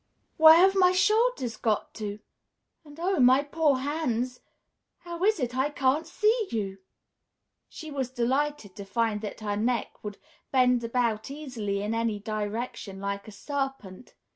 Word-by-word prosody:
"Where 315 0 +9
have 380 +3 +6
my 365 -1 +5
shoulders 425 - +2
got 215 -2 -1
to? 210 -2 -5 0.7
And 295 0 -14
oh, 370 0 0
my 260 +2 +5
poor 295 -1 +1
hands, 255 -3 -2 0.6
how 345 0 -6
is 430 -2 +3
it 250 -2 -2
I 265 +3 +1
can't 285 +2 0
see 430 +5 +1
you?" 195 -4 -3 0.9
She 315 -1 -9
was 270 -3 -2
delighted 260 -3 -1
to 200 - -6
find 210 +1 -1
that 215 0 -7
her 205 -1 -2
neck 235 +3 -2
would 205 -1 -6 0.3
bend 250 -2 +3
about 230 -1 -1
easily 235 -9 -4
in 210 +2 -2
any 230 -2 0
direction, 210 -1 -5
like 200 +1 -4
a - - -9
serpent. 270 -5 -5
250 Hz, 150 wpm, -27 LUFS, 215-295 Hz, 0.9 s, Where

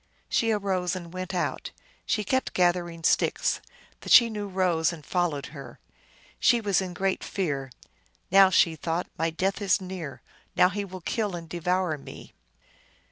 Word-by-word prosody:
She 230 - +1
arose 190 -4 0
and 175 -2 -8
went 185 0 -5
out. 180 -2 -2 0.4
She 210 - +1
kept 260 +6 -1
gathering 175 -2 +1
sticks. - - +1 0.4
The - - -9
Chenoo 220 -4 +5
rose 180 -4 +1
and 160 -4 -10
followed 175 -6 -1
her. 135 -5 -10 0.6
She 240 - +4
was 200 -4 +1
in 180 -2 -5
great 195 0 -1
fear. 140 -8 -3 0.3
" - - -39
Now," 195 0 +7
she 165 -3 +3
thought, 165 +3 -2
" - - -35
my 165 +1 +1
death 190 +5 -1
is 200 0 +3
near; 180 -7 -7 0.3
now 180 - +5
he 205 +2 -3
will 185 -1 -9
kill 205 +1 -2
and 165 -1 -7
devour 175 -1 -1
me." - - -12
180 Hz, 165 wpm, -27 LUFS, 165-195 Hz, 0.6 s, Now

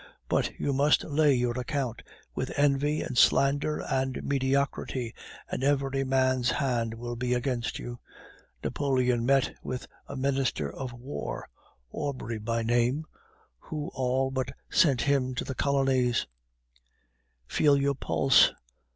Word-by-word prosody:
But - - 0
you 140 - 0
must 145 +3 +3
lay 150 -2 +3
your 125 0 0
account 125 -2 -3 0.3
with - - -3
envy 145 +1 +2
and 125 - -5
slander 140 +4 +3
and 130 -1 -1
mediocrity, 135 -3 -1 0.3
and - - -4
every 135 -1 +1
man's 130 -2 +2
hand 120 -5 0
will 120 +1 -5
be 125 +1 0
against 120 -1 -2
you. 120 0 -7 0.6
Napoleon 125 -4 +1
met 135 -1 +3
with 130 +1 -5 0.2
a - - -7
Minister 130 - 0
of 130 -2 -5
War, 120 +4 -6 0.4
Aubry 125 -5 -4
by 115 +2 -1
name, 120 +6 +1 0.5
who 150 -2 -5
all 130 +1 0
but 130 -1 -2 0.2
sent 135 -7 +4
him 135 -2 +1
to - - -2
the 135 - -4
colonies. 130 -3 +1 1.2
"Feel 145 - +3
your 140 0 +2
pulse. 135 0 +4
130 Hz, 130 wpm, -28 LUFS, 125-140 Hz, 1.2 s, sent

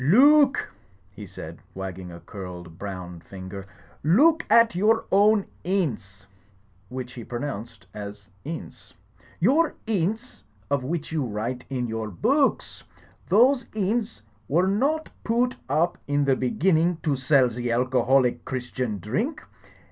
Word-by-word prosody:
*'Loo 275 - +7
ook," 275 -1 0 0.4
he 100 +1 -10
said, 85 -3 -9 0.2
wagging 95 -1 -6
a 85 - -10
curled 90 -3 -9
brown 90 -3 -6
finger, 95 +2 -9 0.4
*1oo 220 - +6
ook 325 - -8
at 230 -3 +6
your 215 +5 +2
own 205 +1 +4 0.2
inns'*^ 115 - -2 0.6
(which 125 0 -6
he 120 - -8
pronounced 115 -5 -6
as 100 -1 -8 0.2
'We'*). 160 +3 -6 0.7
Your 290 - +3
inns 220 +3 -2 0.3
of 140 -2 +1
which 160 +4 -3
you 155 -3 0
write 120 +2 -4
in 130 -2 -2
your 110 -2 -3
boo 270 - +3
ooks! - - -11 0.5
Those 245 +4 +4
inns 210 - -1 0.2
were 170 +6 +3
not 280 +11 0
poo 235 +2 +2
oot 250 0 -2
up 155 +5 +1
in 145 0 +1
the 135 -1 +3
be 130 -1 -1
ginning 170 +2 +2
to 150 -4 +1
sell 130 -1 +3
ze 120 +1 -3
alcoholic 125 +1 +2
Christian 125 -3 -3
drink. 220 - -2
135 Hz, 140 wpm, -25 LUFS, -, 0.7 s, Loo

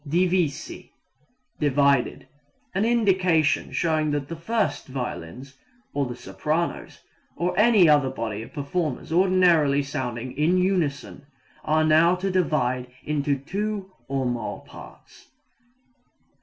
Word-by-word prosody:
Divisi 175 -1 -1 0.7
divided. 140 -2 +2 0.5
An 195 +3 +1
indication 185 -9 +2
showing 155 -2 0
that 145 -1 -2
the 165 - -4
first 215 +7 -2
violins, 130 0 -6 0.3
or 140 -2 0
the 120 - -6
sopranos, 150 - -3 0.4
or 180 +2 -1
any 210 -3 +5
other 145 -3 +4
body 110 -5 -4
of 115 - -10
performers 150 0 -3
ordinarily 170 -6 +3
sounding 130 -3 -4
in 160 +5 +2
unison 175 -7 -1 0.4
are 155 +1 +2
now 160 +3 +4
to 190 +2 -2
divide 130 -9 0 0.2
into 145 -1 0
two 195 +6 -4 0.2
or 135 -1 -1
more 120 -3 -3
parts. - - -14
155 Hz, 115 wpm, -24 LUFS, 135-180 Hz, 0.7 s, any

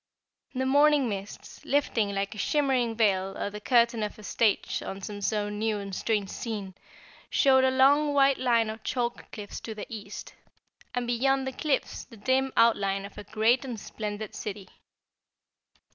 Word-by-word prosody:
The 260 +1 0
morning 285 0 +4
mists, 200 -1 -7
lifting 245 -7 +1
like 195 +2 -2
a 215 - -9
shimmering 260 -2 +1
veil 195 -3 +1
or 205 - -3
the 210 0 -8
curtain 235 -1 +3
of 210 -1 -3
a 215 - -12
stage 215 0 +1
on 195 - -6
some 205 +1 -5 0.4
new 220 -1 0
and 200 -1 -6
strange 205 -2 -1
scene, 205 -5 -5 0.6
showed 265 -2 +4
a 260 - +5
long 280 +3 +4
white 275 -1 +4
line 235 -3 +2
of 220 0 -9
chalk 240 -2 -3
cliffs 205 -2 -7
to 220 - -7
the 210 - -6
east, 220 -3 -8 0.6
and 245 0 -1
beyond 265 +3 +1
the 265 - -2
cliffs 285 0 -1
the 230 - -15
dim 260 +5 +1
outline 195 -4 +3
of 200 - -10
a - - -7
great 220 +5 +2
and 245 -5 -5
splendid 210 0 -6
city. 200 -3 -6
230 Hz, 165 wpm, -28 LUFS, 205-260 Hz, 0.6 s, a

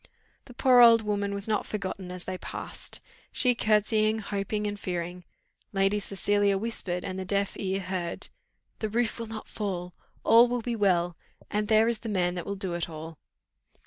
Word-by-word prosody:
The 245 -3 -14
poor 255 -1 +5
old 230 -2 +8
woman 205 -1 -1
was 200 +1 -2
not 215 -1 +1
forgotten 190 -3 -4
as 180 -1 -7
they 185 -1 -4
passed, - - -2 0.3
she 250 -1 +6
courtesying, 215 -1 +2
hoping, 210 0 -3
and 205 0 -3
fearing: 175 -1 -4 0.5
Lady 195 +1 +2
Cecilia 200 0 +1
whispered, 190 -4 -2
and 185 -1 -4
the - - -3
deaf 200 +1 0
ear 190 -1 -1
heard. 180 -2 -3 0.5
"The 215 - -2
roof 230 +1 0
will 230 - -4
not 220 -1 -7
fall 180 -4 -4 0.3
all 230 +2 +7
will 245 -1 -2
be 240 0 -2
well: 175 -5 +2 0.4
and 210 0 0
there 220 +1 +4
is 235 -2 0
the 225 - -6
man 180 -3 +1
that 175 -1 -5
will 200 - -2
do 190 -2 -2
it 170 0 -3
all." 160 0 -8
200 Hz, 180 wpm, -28 LUFS, 185-220 Hz, 0.5 s, old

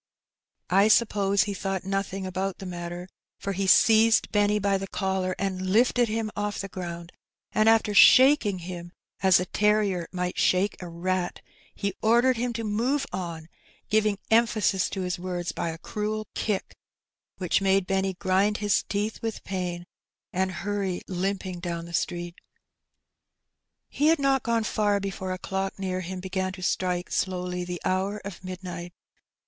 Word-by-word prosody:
I 195 +3 +5
suppose 205 -3 +3
he 205 - -3
thought 195 -1 -3
nothing 195 0 -2
about 185 +1 -3
the 195 - -8
matter^ 175 0 -6 0.3
for 200 - -3
he 195 +1 -1
seized 225 +3 +5
Benny 205 0 +3
by 200 -1 +1
the 195 - -5
collar 190 -1 -1
and 190 -1 -2
lifted 240 +3 +3
him 220 0 -2
off 205 0 -2
the 195 - -3
ground^ 170 -2 -6 0.4
and 215 +1 +4
after 225 -2 +3
shaking 255 -1 +7
him 175 -1 -7 0.3
as 190 -2 +6
a 180 - -1
terrier 205 -4 +1
might 180 -1 -3
shake 190 +2 +2
a 180 - -6
rat, 180 +1 -2 0.3
he 200 -1 -2
ordered 240 +3 +4
him 245 +1 -1
to 230 0 -4
move 240 +7 0
on, 165 -3 -5 0.4
giving 215 -1 +2
emphasis 220 -4 +3
to 195 - -4
his 180 -1 -2
words 175 -1 -3
by 170 - -3
a 165 - -5
cruel 215 +4 -3
kick, 210 -3 -2 0.6
which 185 +1 +1
made 195 -1 +3
Benny 190 0 0
grind 195 +3 +1
his 205 -1 +2
teeth 210 +2 -3
with 225 -1 -4
pain^ 180 -2 -3 0.5
and 185 +1 0
hurry 200 -3 -2
limping 185 0 -3
down 170 -1 -4
the 170 - -11
street. 175 0 -3 1.5
He 295 - 0
had 325 +1 +5
not 275 -2 +2
gone 230 -1 0
far 210 -2 +1
before 190 -1 -4
a 185 - -2
clock 190 +1 -3
near 185 -1 -2
him 185 +1 -6
began 185 0 -2
to 185 -1 -9
strike 180 0 -1
slowly 180 -1 -1
the 175 -1 -5
hour 190 +3 0
of 195 -3 -8
midnight. 180 -1 -7
195 Hz, 160 wpm, -26 LUFS, 180-210 Hz, 1.5 s, shaking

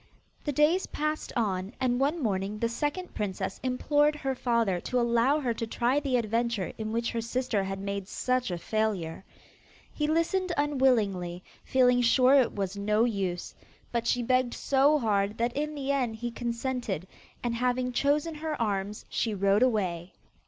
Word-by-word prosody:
The 295 - 0
days 300 +7 +3
passed 305 +1 -2
on, 200 -3 -1
and 250 -1 +1
one 290 +3 +1
morning 200 -1 -1
the 230 - 0
second 295 +9 -3
princess 190 -2 -3
implored 290 +4 +2
her 270 -3 -2
father 235 -7 +1
to 250 - -1
allow 235 +5 +3
her 245 -4 0
to 230 0 -4
try 245 +5 +1
the 275 -3 0
adventure 230 -3 -1
in 215 0 -3
which 230 +1 -1
her 230 - -2
sister 230 -3 -1
had 195 0 -4
made 200 -1 -4
such 255 +2 -1
a 175 - -2
failure. 195 -4 -2 0.7
He 300 - -1
listened 345 +3 +1
unwillingly, 220 -12 +1 0.2
feeling 250 -1 +3
sure 255 +2 +5
it 265 -4 +4
was 195 -1 -2
no 210 +2 +2
use, 195 -7 -2 0.4
but 235 -1 -1
she 245 - +1
begged 255 0 +1
so 280 +2 +3
hard 210 -4 0
that 235 +1 0
in 300 +1 -2
the 280 -1 -2
end 250 -5 0
he 240 +2 -4
consented, 235 - -3 0.4
and 240 -1 0
having 250 +1 0
chosen 290 +5 +1
her 305 -1 -4
arms, 205 -2 -2
she 220 -3 -1
rode 200 +2 +3
away. 190 -8 0
235 Hz, 165 wpm, -28 LUFS, 205-270 Hz, 0.7 s, sure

